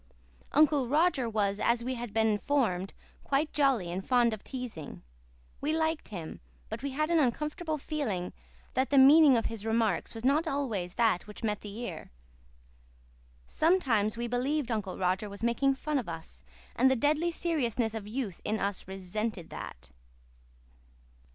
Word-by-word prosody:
Uncle 290 -3 +4
Roger 290 -3 +2
was, 205 -2 0
as 235 0 +2
we 255 +2 -2
had 240 -3 -5
been 220 +1 +2
informed, 210 -4 0 0.3
quite 285 +3 0
jolly 265 - +2
and 185 +2 -3
fond 240 -1 +3
of 215 - -7
teasing. 245 - -7 0.6
We 300 +2 0
liked 320 0 -1
him; 170 -6 -7 0.3
but - - -5
we 280 - -2
had 305 +4 -1
an 335 - +4
uncomfortable 300 +4 -1
feeling 255 - -3 0.4
that 260 +2 +1
the 280 - +3
meaning 280 0 +8
of 225 - -1
his 225 -3 -4
remarks 225 -3 0
was 225 +2 -6
not 300 +5 +3
always 230 - -2
that 220 -6 +2
which 210 - -11
met 210 -2 -1
the 205 0 -8
ear. 180 -10 -6 1.4
Sometimes 240 - +2
we 235 - -2
believed 250 +2 -1
Uncle 210 -4 -2
Roger 185 +3 0
was 200 +2 -9
making 270 +4 +2
fun 295 +1 -1
of 230 - -5
us, 160 - -8 0.3
and 260 +2 +5
the 265 - +3
deadly 300 +7 +2
seriousness 250 -10 -1
of 215 -2 -5
youth 215 -5 -4
in 215 +1 -1
us 200 -2 -2
resented 195 0 -4
that. - - -8
235 Hz, 160 wpm, -30 LUFS, 205-280 Hz, 1.4 s, meaning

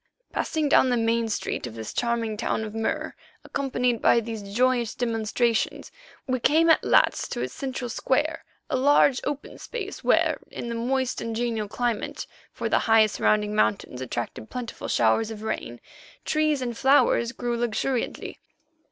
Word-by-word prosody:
Passing 310 -2 -1
down 265 -2 +5
the 245 - +2
main 230 0 +1
street 205 - -3
of 115 - -9
this 110 -1 -6
charming 235 -2 -1
town 220 0 -1
of 215 -1 -6
Mur, 225 0 -2 0.3
accompanied 250 -4 -1
by 235 - +5
these 225 -1 -5
joyous 235 +3 +1
demonstrators, 230 0 0 0.3
we 255 -1 -1
came 325 +6 +4
at - - +4
last - - +3
to - - -3
its - - -3
central 260 -3 -4
square, 295 +7 0 0.2
a - - -1
large, 275 0 +4
open 290 0 -5
space 410 -4 -6
where, - - +3
in 240 - -6
the - - -2
moist 255 +2 -1
and 230 -1 -3
genial 225 -2 -1
climate, 235 +1 -2 0.3
for - - -3
the - - +3
high 220 -1 +7
surrounding 210 0 +1
mountains 200 -11 0
attracted 120 -3 -5
plentiful 245 -2 -6
showers 120 - +2
of 220 -1 -7
rain, 120 - -4 0.5
trees 310 -3 +1
and 240 -2 -3
flowers 265 -3 +4
grew 240 -2 -3
luxuriantly. 240 +2 -2
235 Hz, 160 wpm, -25 LUFS, 220-260 Hz, 0.5 s, high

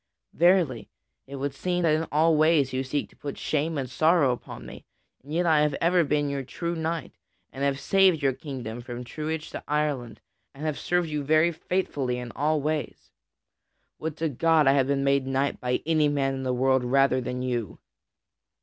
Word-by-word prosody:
Verily, 170 - +2 0.4
it 140 - -8
would 140 0 -3
seem 180 +5 -1
that 160 -2 +3
in 160 +1 0
all 160 +2 +4
ways 155 -4 +3
you 130 +1 -1
seek 140 +2 -2
to - - -21
put 140 -1 -7
shame 155 +1 -1
and 135 -2 -2
sorrow 155 +1 +3
upon 125 - -7
me. - - -10 0.4
And 145 - -13
yet 175 +3 +1
I 155 -3 +4
have 150 -2 +1
ever 175 +1 +3
been 145 -1 0
your 140 -1 -2
true 170 +6 -4
knight, 165 0 -3 0.4
and 135 - -4
have 140 -1 +1
saved 190 0 +4
your 135 -1 +3
kingdom 125 -5 -7
from 120 0 -7
truage 155 +4 -5
to - - -7
Ireland 145 -6 -1 0.4
and 145 +3 -7
have 155 -2 -2
served 175 -1 0
you 150 -1 -2
very 155 +4 +3
faithfully 150 -7 -2
in 125 -1 -6
all 155 +1 0
ways. 155 0 -3 0.9
Would 160 -1 -4
to 160 0 -1
God 160 +3 +3
I 135 - +5
had 135 -2 +2
been 140 -1 0
made 140 -1 +2
knight 135 +1 0
by 125 0 -1
any 155 -2 +3
man 140 -2 0
in 135 - -4
the 130 -1 -1
world 130 +1 +2
rather 130 +1 +3
than 125 0 -4
by - - -2
you." 120 -6 -3
145 Hz, 200 wpm, -26 LUFS, 130-160 Hz, 0.9 s, I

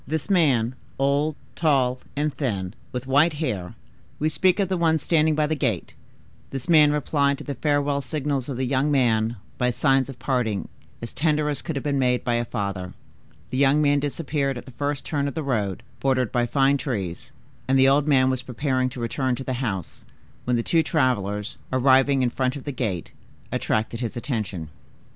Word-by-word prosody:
This 160 +6 -2
man, 130 - +3 0.2
old, 140 +3 +1 0.2
tall, 130 -5 +2 0.2
and 150 0 0
thin, 100 -9 -2 0.2
with 125 0 -4
white 145 +5 +4
hair,—we 135 - -4
speak 185 +4 +2
of 195 - +2
the 190 - 0
one 165 -2 +3
standing 155 0 +2
by 155 0 +2
the 155 - -1
gate;—this 135 -2 -5
man 155 -3 +6
replied 140 -1 +1
to - - -9
the 140 - -4
farewell 145 +1 +1
signals 140 -3 -2
of 130 - -3
the 130 - 0
young 135 +3 +1
one 115 -4 +2 0.2
by 125 -1 +2
signs 135 +1 +2
of 135 - -8
parting 125 -6 -1 0.3
as 115 - -6
tender 150 -1 +1
as 145 -2 -2
could 160 - -4
have 140 - -3
been 140 -2 0
made 125 -1 +2
by 120 - 0
a 120 0 0
father. 100 -5 -4 0.6
The 130 - -1
young 140 +1 +4
man 145 -1 +3
disappeared 140 -2 -1
at - - -8
the 130 - -11
first 145 +2 -3
turn 145 -3 -1
of 140 - -5
the 160 - -2
road, 105 -9 -1 0.2
bordered 130 -4 +1
by 120 -1 +1
fine 140 +2 +3
trees, 105 - -4 0.4
and 135 +1 +3
the 135 0 +6
old 140 +2 +3
man 130 -3 +4
was 130 -1 -2
preparing 130 0 -1
to 125 - -9
return 125 +2 -1
to 135 - -6
the 130 - -3
house, 95 -8 -4 0.4
when 125 - +1
the 115 - 0
two 165 +5 +3
travelers, 105 - 0
arriving 130 +1 +4
in 120 - +1
front 130 +1 -1
of 140 - -7
the 145 - -4
gate, 110 - -3 0.4
attracted 110 +1 -1
his 120 -2 -4
attention. 105 - -3
135 Hz, 190 wpm, -24 LUFS, 120-145 Hz, 0.6 s, man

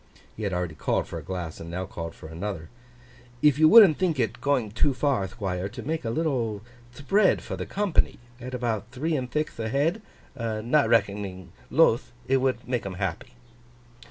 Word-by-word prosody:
He - - -8
had 100 -2 -1
already 90 -2 -2
called - - -1
for - - -5
a - - -11
glass, 90 -4 -5
and 80 - -8
now 90 +2 -3
called 85 -2 -7
for - - -13
another. 85 0 -5 0.7
'If 150 -1 +5
you 155 0 +7
wouldn't 205 -8 +8
think 175 -6 +1
it 115 0 -1
going 130 -7 +1
too 130 +5 +1
far, 130 -9 +1
Thquire, 95 -1 -3
to 120 -1 -8
make 160 0 -2
a 115 - -2
little 115 -7 -1 0.3
thpread 190 +10 +2
for - - -5
the - - -5
company 200 -4 +1 0.2
at 125 +1 -6
about 115 -3 -2
three 155 +6 -2
and 130 -3 -2
thixth 150 -1 -2
ahead, 140 - 0 0.3
not 115 +5 +1
reckoning 100 -5 0 0.2
Luth, 130 -6 +3
it 135 - +3
would 130 -2 -1
make 125 -2 -1
'em 95 -2 -5
happy. 95 +5 -4
120 Hz, 185 wpm, -26 LUFS, 100-145 Hz, 0.7 s, wouldn't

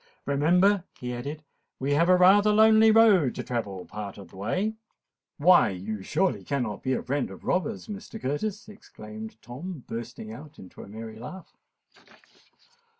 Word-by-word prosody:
"Remember," 180 +7 +3 0.2
he 125 0 -4
added, 145 +6 -6 0.4
"we 135 +2 -1
have 165 +4 +3
rather 190 +3 +6
a - - +3
lonely 220 +1 +6
road 215 - +5
to - - -4
travel 100 -7 -4
part 105 -2 -7
of 100 -4 -11
the - - -17
way——" 185 - -1 0.6
"Why—you 110 - +3
surely 175 - 0
cannot 120 -8 -3
be 130 - -1
afraid 140 +2 -2
of 95 - -12
robbers, 195 +3 -1
Mr. 215 +1 -8
Curtis?" 195 +10 -3
exclaimed 110 - -10
Tom, 135 - -8
bursting 115 -1 -7
out 145 +5 -12
into 95 - -12
a - - -11
merry 110 +1 -9
laugh. 180 +10 -10
145 Hz, 150 wpm, -27 LUFS, -, 0.6 s, rather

